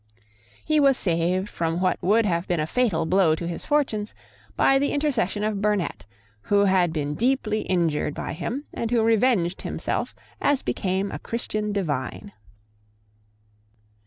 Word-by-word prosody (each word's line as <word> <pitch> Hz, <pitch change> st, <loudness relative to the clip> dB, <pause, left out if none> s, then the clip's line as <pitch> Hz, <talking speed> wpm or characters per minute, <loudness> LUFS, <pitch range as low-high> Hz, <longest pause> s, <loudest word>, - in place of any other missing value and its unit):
He 310 Hz, 0 st, +3 dB
was 275 Hz, -3 st, +4 dB
saved 180 Hz, +2 st, 0 dB
from 165 Hz, -3 st, -2 dB
what 185 Hz, 0 st, 0 dB
would 215 Hz, +4 st, +3 dB
have 170 Hz, -2 st, 0 dB
been 175 Hz, -2 st, 0 dB
a 155 Hz, -, +1 dB
fatal 180 Hz, -5 st, +1 dB
blow 180 Hz, -2 st, +3 dB
to 170 Hz, +1 st, -5 dB
his 170 Hz, -, -6 dB
fortunes 265 Hz, -9 st, 0 dB, 0.4 s
by 270 Hz, 0 st, +4 dB
the 285 Hz, -, 0 dB
intercession 240 Hz, -, 0 dB
of 210 Hz, -2 st, -1 dB
Burnet, 200 Hz, -, -1 dB, 0.3 s
who 200 Hz, -, +2 dB
had 185 Hz, -3 st, +3 dB
been 150 Hz, -2 st, -2 dB
deeply 230 Hz, -, 0 dB
injured 165 Hz, -5 st, 0 dB
by -, -, -4 dB
him, 235 Hz, -, -4 dB
and 230 Hz, -, -3 dB
who 235 Hz, -1 st, +2 dB
revenged 225 Hz, -5 st, +2 dB
himself -, -, -3 dB, 0.3 s
as 285 Hz, -2 st, +2 dB
became 190 Hz, +1 st, -1 dB
a -, -, -5 dB
Christian 215 Hz, -2 st, -3 dB
divine. 175 Hz, 0 st, -3 dB
200 Hz, 150 wpm, -24 LUFS, 170-230 Hz, 0.4 s, was